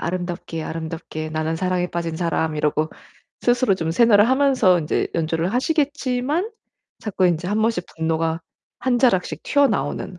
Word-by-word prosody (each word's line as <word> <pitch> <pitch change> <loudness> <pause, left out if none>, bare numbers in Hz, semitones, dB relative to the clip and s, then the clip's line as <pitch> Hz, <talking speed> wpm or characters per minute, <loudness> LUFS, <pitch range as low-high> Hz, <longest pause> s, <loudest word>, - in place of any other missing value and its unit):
아름답게, 175 -2 -4
아름답게 160 -1 -5
나는 160 +1 -1
사랑에 180 0 0
빠진 170 -1 -3
사람.' 160 -2 -1
이러고 150 +1 0 0.5
스스로 245 -4 +3
좀 165 -3 -2
세뇌를 215 +2 +5
하면서 260 -9 +4
인제 155 -2 -1
연주를 165 +3 -1
하시겠지만 290 - 0 0.5
자꾸 190 -3 0
인제 175 +1 0
1 210 +2 0
번씩 225 -6 0
분노가 160 0 0 0.4
한 245 -1 +1
자락씩 235 -8 +1
튀어나오는 260 -9 0
180 Hz, 340 characters per minute, -22 LUFS, 160-245 Hz, 0.5 s, 세뇌를